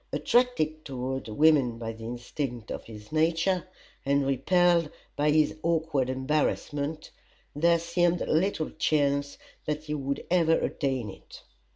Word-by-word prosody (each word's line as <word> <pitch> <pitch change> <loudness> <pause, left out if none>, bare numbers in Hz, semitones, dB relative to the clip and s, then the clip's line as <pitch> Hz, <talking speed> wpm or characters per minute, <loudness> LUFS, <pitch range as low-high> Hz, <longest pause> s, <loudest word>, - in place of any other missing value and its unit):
Attracted 155 -12 +1
toward 130 -1 -4
women 135 -1 +3
by 115 -1 -4
the 110 0 -10
instinct 120 0 -5
of - - -6
his 105 -1 -12
nature, 165 +4 +1 0.4
and 140 0 +2
repelled 170 +5 +3 0.3
by 150 +1 +2
his 155 0 +3
awkward 160 -6 0
embarrassment, 145 +2 -1 0.4
there 170 +3 +4
seemed 170 +1 +1
little 165 0 0
chance 145 -2 0 0.3
that 150 0 -2
he 150 -1 -4
would 140 -1 -3
ever 165 -3 +4
attain 130 -9 -1
it. - - -14
150 Hz, 130 wpm, -28 LUFS, 130-165 Hz, 0.4 s, there